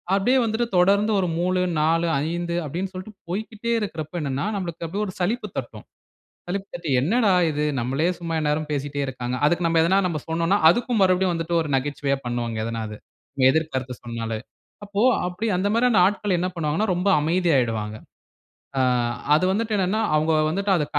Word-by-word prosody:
அப்டியே 245 +7 +3
வந்துட்டு 225 +2 0
தொடர்ந்து 200 +4 +4
ஒரு 185 - 0
மூலு, 185 +1 +1 0.2
4, 165 +2 +2 0.2
5 170 0 -2
அப்டின்னு 180 +6 -4
சொல்லிட்டு, 185 +3 -8
போய்க்கிட்டே 220 +4 -3
இருக்கிறப்ப 160 -6 -5
என்னன்னா, 140 +1 -2
நம்மளுக்கு 170 -4 -4
அப்டியே 200 +5 -2
ஒரு 185 - -7
சலிப்பு 210 +4 -1
தட்டும். 115 -5 -6 0.6
சலிப்பு 195 +2 -3
தட்டி, 170 -3 -5
என்னடா 205 - +3 0.2
இது! 150 0 -1 0.2
நம்மலே 135 +7 0
சும்மா 165 -1 -4
எந்நேரமும் 150 0 -1
பேசிட்டே 145 0 -3
இருக்காங்க. 125 -1 -4
அதுக்கு 175 +3 +2
நம்ப 165 0 +2
எதுனா 190 +4 +3
நம்ப 165 -4 -2
சொன்னோன்னா, 165 +4 +2
அதுக்கும் 240 +3 +1
மறுபடியும் 185 -1 +2
வந்துட்டு, 165 +1 -2
ஒரு 155 - -4
நகைச்சுவையா 140 0 -1
பண்ணுவாங்க. 120 -2 -2
எதனா 115 -1 -3
அது. 105 - -8 0.4
நம்ம 130 -2 +4
எதிர் 160 +2 0
கருத்து 130 -1 -3
சொன்னாலே. 115 -2 -4 0.5
அப்போ 205 0 -2 0.3
அப்படி 180 +5 -3
அந்த 190 +3 0
மாரியான 235 -2 +3
ஆட்கள் 200 -2 0
என்ன 180 - 0
பண்ணுவாங்கன்னா, 165 +6 0
ரொம்ப 180 +3 +1
அமைதியாயிடுவாங்க. 130 -11 +1 0.8
ஆ - - +3 0.5
அது 155 - +2
வந்துட்டு 215 +2 0
என்னன்னா, 195 +3 +1
அவங்க 155 +1 +2 0.2
வந்துட்டு 195 +4 -1
அத 150 - 0
170 Hz, 170 wpm, -23 LUFS, 145-195 Hz, 0.8 s, தொடர்ந்து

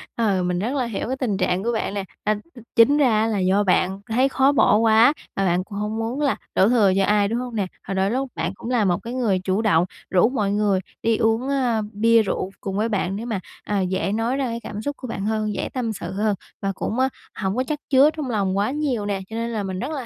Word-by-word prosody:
Ờ, 200 -6 +1
mình 180 0 0
rất 235 +8 -2
là 260 -3 0
hiểu 230 -2 -4
cái 260 +2 -2
tình 215 -7 0
trạng 185 0 0
của 235 - 0
bạn 220 -3 -2
nè, 200 - -2 0.2
à, 215 0 +2 0.2
th - - -10 0.2
chính 265 +6 +6
ra 280 -4 +4
á 220 - +2
là 215 -3 0
do 190 +2 +2
bạn 190 0 +1
thấy 255 +5 +3
khó 270 +1 +3
bỏ 260 -6 +4
quá, 225 +4 +5 0.2
mà 195 - 0
bạn 180 0 +1
cũng 200 +1 -8
hổng 210 +1 -2
muốn 235 +6 -2
là 280 -2 +2 0.2
đổ 190 - +5
thừa 220 -6 +4
cho 195 - +3
ai, 205 -1 +3
đúng 230 +3 -1
hông 245 -2 -5
nè? 200 -3 0 0.2
Rồi 195 - -2
đôi 190 +2 +1
lúc 265 +2 -1
bạn - - -2
cũng 230 - -7
là 240 -4 +2
một 175 -2 +2
cái 235 +1 -5
người 225 -7 +1
chủ 190 +3 0
động 180 -6 +3 0.2
rủ 185 +4 +4
mọi 210 -6 0
người 205 -2 +2 0.2
đi 225 -1 +2
uống, 225 +4 +1
a, 245 -5 +1
bia 230 +2 +4
rượu 195 -2 -2
cùng 195 0 -3
với 220 +2 +1
bạn 195 -3 -1
để 220 +3 -5
mà, 220 -5 -2 0.2
à, 205 -2 -1
dễ 185 +1 -1
nói 230 +5 0
ra 275 - 0
cái 235 -1 -3
cảm 210 +1 -6
xúc 285 +4 -4
của 255 - -7
bạn 200 -4 -4
hơn, 215 -1 -1
dễ - - -3
tâm 235 -4 -2
sự 175 -1 -6
hơn, 210 +1 0 0.3
và 195 - 0
cũng, 225 +5 -3
á, 265 - +3 0.3
hổng 190 +1 -1
có 255 - +1
chắc 300 -1 -2
chứa 275 +2 +6
trong 290 -4 -3
lòng 195 -4 0
quá 205 +5 +1
nhiều 270 -8 -1
nè, 200 -1 -2
cho 225 - -7
nên 230 +1 -2
là 220 -3 -2
mình 190 -1 -4
rất 260 +8 -3
là 275 -6 -4
220 Hz, 275 wpm, -23 LUFS, 195-245 Hz, 0.3 s, chính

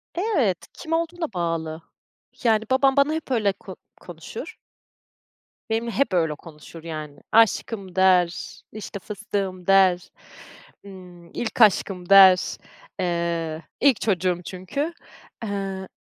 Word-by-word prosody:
Evet, 320 - 0
kim 320 - -6
olduğuna 330 - -2
bağlı. 165 -2 -3 0.6
Yani, 220 -2 +3
babam 270 +1 +4
bana 280 +2 +4
hep 320 -4 -5
öyle 210 -5 +2
ko - - -11 0.3
konuşur. - - -9 1.1
Benimle 230 +1 -1
hep 220 0 0
öyle 160 -4 +1
konuşur, 160 0 -13
yani. 155 -3 -7
Aşkım 215 -3 +2
der, 180 -2 +2 0.2
işte, 205 -1 -7
fıstığım 195 -3 -5
der. 190 -2 +4 0.7
Imm, 180 -3 -13
ilk 240 0 -3
aşkım 190 -3 +3
der. 190 -2 +7 0.4
Eee, 170 -2 -2 0.2
ilk 275 -4 +4
çocuğum 185 -4 0
çünkü, 235 - -4 0.5
eee, 195 -2 -4
190 Hz, 110 wpm, -24 LUFS, 175-225 Hz, 1.1 s, der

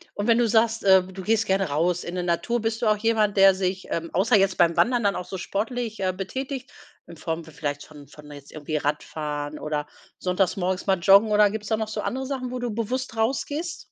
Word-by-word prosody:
Und 205 - -3
wenn 230 0 +5
du 240 - +3
sagst, 225 0 +2
äh, 190 -1 +6
du 190 +1 -9
gehst 220 +3 +1
gerne 195 -3 +1
raus 170 +4 0
in 175 - -6
'ne 180 - -2
Natur, 180 +8 -1
bist 225 +1 -2
du 225 - +1
auch 215 - +3
jemand, 215 -2 +1
der 195 0 +7
sich, 190 0 -2
ähm, 165 0 -2
außer 210 +6 +3
jetzt 195 -1 +2
beim 170 0 +3
Wandern 245 -2 +2
dann 200 - +2
auch 180 - -4
so 190 - -6
sportlich, 225 +4 -3
äh, 185 -1 0
betätigt, 260 +8 -5 0.4
in 170 - -11
Form 165 +1 -4
vielleicht 145 -2 -5
von 145 -2 -14
von 150 +1 -14
jetzt 145 -1 -12
irgendwie 155 0 -4
Radfahren 150 0 -3
oder 150 -1 -3 0.3
sonntags 180 0 0
morgens 185 +1 -2
mal 190 - +3
joggen 200 +5 +6
oder 210 0 +5
gibt's 210 -1 -5
da 220 0 +1
noch 220 -1 -2
so 220 - -3
andere 265 +1 -3
Sachen, 260 -2 -4
wo 255 - -4
du 245 -2 -3
bewusst 235 +2 -3
rausgehst? 285 +8 -2
195 Hz, 230 wpm, -24 LUFS, 170-225 Hz, 0.4 s, der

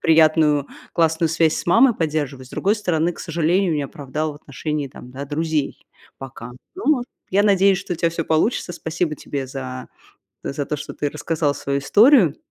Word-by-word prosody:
приятную 155 -3 +4 0.3
классную 165 0 +2
связь 160 0 +2
с - - -5
мамой 230 +8 +5
поддерживать. 150 -6 -2
С - - -19
другой 205 +3 +1
стороны, 175 -5 0
к - - -11
сожалению, 170 +1 +1
не 145 - -1
оправдал 145 +2 -4
в - - -13
отношении, 150 0 -4
там, 125 -1 -12
да, 135 +2 -6
друзей 155 0 -2 0.3
пока. 125 -3 -9 0.2
Ну, 305 -9 +1 0.3
я 200 +2 +3
надеюсь, 195 -2 +4
что 195 -1 -5
у - - -3
тебя 170 0 +1
всё 165 -1 -3
получится. 175 +3 0
Спасибо 160 -1 -2
тебе 140 -2 -5
за 130 -1 -7 0.6
за 140 +1 -3
то, 150 - -2
что 145 - -7
ты 145 - -2
рассказал 155 -1 -1
свою 140 0 -2
историю. 205 - +5
155 Hz, 180 wpm, -21 LUFS, 145-175 Hz, 0.6 s, мамой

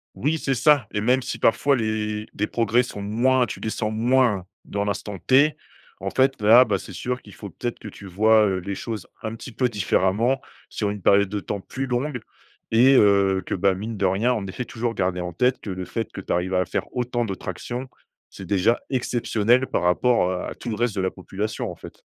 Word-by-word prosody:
Oui, 155 +5 0
c'est 135 -3 -1
ça, 145 0 +4
et 105 - -1
même 125 +4 +2
si - - -5
parfois 140 +5 +3
les 110 -2 -2
des 105 - 0
progrès 115 +2 +1
sont 105 -4 -7
moins 120 +5 +2
tu - - -6
les 110 - -3
sens 110 -1 -2
moins 115 -3 +2 0.2
dans 100 0 -3
l'instant 100 0 -3
T, 135 - +3 0.4
en - - -4
fait 135 0 +2
là, 115 +4 +7
bah, 100 -4 0
c'est 95 - -10
sûr 125 +8 -3
qu'il 105 - -14
faut 100 - -9
peut-être 120 +6 -5
que - - -9
tu 100 -1 -11
vois, 110 +3 +4
heu, 95 -2 0
les 100 +2 -5
choses 110 -4 -6 0.2
un 110 0 -3
petit 125 - -9
peu 125 +2 0
différemment 105 +4 +1 0.3
sur 105 -2 -2
une 105 -1 -6
période 100 +1 +4
de 105 +1 -2
temps 100 0 -5
plus 135 +7 -5
longue 125 +1 -2 0.5
et 125 +4 +5
heu, 100 -4 +4
que - - -3
bah 95 +1 +2
mine 105 +4 -5
de 100 - 0
rien. 100 +7 +2
En 105 -5 -3
effet 100 +6 -5
toujours 115 0 -3
garder 90 -3 -1
en 90 -1 -4
tête 125 +8 +1
que 100 - -5
le 95 0 -4
fait 115 +4 -4
que - - -7
tu - - -7
arrives 90 +2 0
à 90 0 +2
faire - - -2
autant 120 -1 -1
de 100 - -3
tractions, 120 +8 -6 0.4
c'est - - -10
déjà 100 +4 +2
exceptionnel 120 -1 +1
par - - -1
rapport, 90 +3 +2
heu, 90 -1 -3
à - - -5
tout 120 - -7
le 110 - -2
reste 115 -1 -1
de 95 - -1
la 95 - +1
population 100 +3 -4
en - - -9
fait. - - -13
110 Hz, 225 wpm, -23 LUFS, 100-125 Hz, 0.5 s, là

